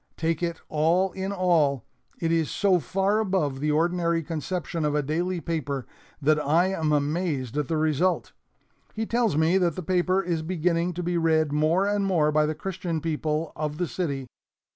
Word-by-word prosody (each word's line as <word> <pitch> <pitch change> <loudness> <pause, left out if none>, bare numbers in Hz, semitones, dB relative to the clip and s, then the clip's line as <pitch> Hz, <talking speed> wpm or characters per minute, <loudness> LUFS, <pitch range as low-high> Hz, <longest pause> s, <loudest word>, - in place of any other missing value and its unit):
Take 165 0 -1
it 170 -1 -2
all 170 +5 +2
in 190 +1 -4
all, 165 - +2 0.3
it 165 -1 0
is 165 -2 +1
so 190 -3 +2
far 195 - +1
above 185 -10 0
the 150 +2 0
ordinary 170 +1 +1
conception 165 +1 -3
of 150 -1 0
a 150 - +1
daily 175 +5 -1
paper 145 -5 -3 0.3
that 150 +1 +2
I 170 +6 +3
am 160 -5 -1
amazed 145 -3 -1
at 150 -2 -1
the 160 - 0
result. 155 +4 +1 0.6
He 220 0 -1
tells 230 -9 +1
me 165 +4 +3
that 175 -3 +1
the 185 - -5
paper 185 +2 +2
is 170 -2 -1
beginning 170 +1 0
to 175 +1 -4
be 175 0 0
read 160 -2 +2
more 155 +6 +2
and 205 0 +1
more 165 -6 +2
by 150 0 +3
the 155 - -2
Christian 175 -3 -3
people 155 0 -2
of 150 -1 -3
the 175 - -1
city. 140 -8 -3
165 Hz, 185 wpm, -26 LUFS, 150-180 Hz, 0.6 s, I